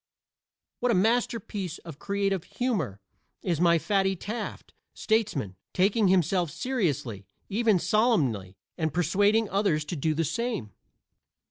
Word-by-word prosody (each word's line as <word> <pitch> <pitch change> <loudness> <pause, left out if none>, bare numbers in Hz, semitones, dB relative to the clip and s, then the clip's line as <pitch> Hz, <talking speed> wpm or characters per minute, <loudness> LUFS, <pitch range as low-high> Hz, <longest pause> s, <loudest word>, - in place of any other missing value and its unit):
What 245 0 +2
a - - +3
masterpiece 210 -4 0
of 165 -4 -11
creative 195 -3 -1
humor 185 - -2 0.4
is 170 -4 0
my 170 -1 +5
Fatty 195 +2 +1
Taft, 215 +5 -6 0.2
statesman, 195 - 0 0.2
taking 200 +3 +3
himself 180 -1 +2
seriously, 150 - -2 0.2
even 215 -1 +3
solemnly, 160 - +1 0.2
and 160 -1 0
persuading 205 +6 +3
others 195 -7 +1
to 175 - -4
do 155 +1 0
the 165 +1 +1
same! 230 - -2
190 Hz, 120 wpm, -27 LUFS, 155-215 Hz, 0.4 s, my